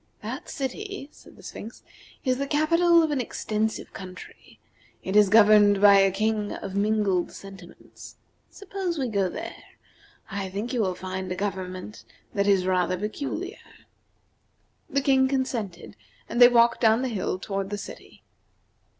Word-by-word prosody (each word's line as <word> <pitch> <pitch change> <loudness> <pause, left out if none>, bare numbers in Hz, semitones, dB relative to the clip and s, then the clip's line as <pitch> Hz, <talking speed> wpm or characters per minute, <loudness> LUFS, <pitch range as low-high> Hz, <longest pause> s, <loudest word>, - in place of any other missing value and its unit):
"That - - -6
city," 325 +4 -5
said - - -18
the - - -17
Sphinx, 225 +3 -9 0.4
"is 255 0 +1
the 280 - -2
capital 335 +3 +4
of 315 - 0
an 280 -3 0
extensive 220 -2 -3
country. 185 -1 -11 0.4
It 190 - -3
is 210 -2 +6
governed 210 -1 +6
by 200 -1 +7
a 195 0 +5
king 210 +2 -1
of 195 - -7
mingled 200 -3 +1
sentiments. 195 -3 -13 0.3
Suppose 385 -3 -5
we 265 -3 -1
go 200 -3 0
there. - - -6 0.8
I 195 -1 -3
think 205 +7 -4
you 245 - +1
will 185 -3 0
find 185 0 -5
a - - -1
government 185 0 -5 0.3
that 200 0 0
is 195 -2 +3
rather 185 -1 +1
peculiar." 285 - -4 1.3
The 275 - +1
King 265 -1 +3
consented, 250 -8 -3 0.3
and 240 - -1
they 245 - +12
walked 235 -1 +4
down 225 +1 +4
the - - 0
hill 195 -5 -2
toward 195 0 -4
the 205 - -3
city. 205 - -11
210 Hz, 150 wpm, -25 LUFS, 195-265 Hz, 1.3 s, they